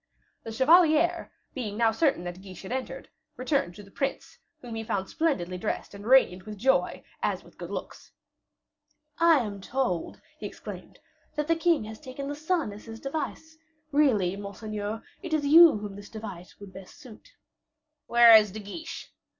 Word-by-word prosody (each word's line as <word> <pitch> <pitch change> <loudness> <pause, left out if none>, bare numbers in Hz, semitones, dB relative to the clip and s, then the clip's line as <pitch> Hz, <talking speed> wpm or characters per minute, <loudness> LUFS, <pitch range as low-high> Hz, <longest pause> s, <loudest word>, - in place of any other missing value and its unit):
The 225 - -7
chevalier, 325 +6 +4 0.2
being 215 -6 -5
now 230 -1 +3
certain 270 - +1
that 175 +1 -7
Guiche 190 -2 -11
had 190 - -8
entered, 260 0 -4 0.3
returned 255 - -1
to 205 - -11
the 200 - -17
prince, 275 - -4 0.2
whom 240 -2 -9
he 225 0 -4
found 195 -3 -2
splendidly 185 - -1
dressed 210 - -4
and 200 +1 -9
radiant 215 -8 +4
with 210 -1 -7
joy, 265 +6 +1 0.2
as - - -1
with - - -20
good - - -7
looks. - - -7 1.1
"I 330 -4 +5
am 205 -3 -6
told," 215 -6 -2 0.2
he - - -4
exclaimed, - - -10 0.4
"that 300 0 -2
the 330 - +3
king 330 -5 +2
has 220 0 -9
taken 275 0 -7
the 290 - -3
sun 315 - -1
as 205 - -12
his 225 -1 -9
device; 315 +3 -5 0.3
really, 230 -11 +3
monseigneur, 205 +2 -5 0.2
it 340 -4 -2
is 295 -2 -1
you 320 -2 +8
whom 205 -1 -7
this 205 0 -11
device 200 -5 -9
would 200 -2 -12
best 190 0 -12
suit." 260 - -15 0.7
"Where 235 -1 +8
is 210 -2 +6
De 215 - -7
Guiche?" 315 +11 -8
225 Hz, 175 wpm, -27 LUFS, 205-300 Hz, 1.1 s, you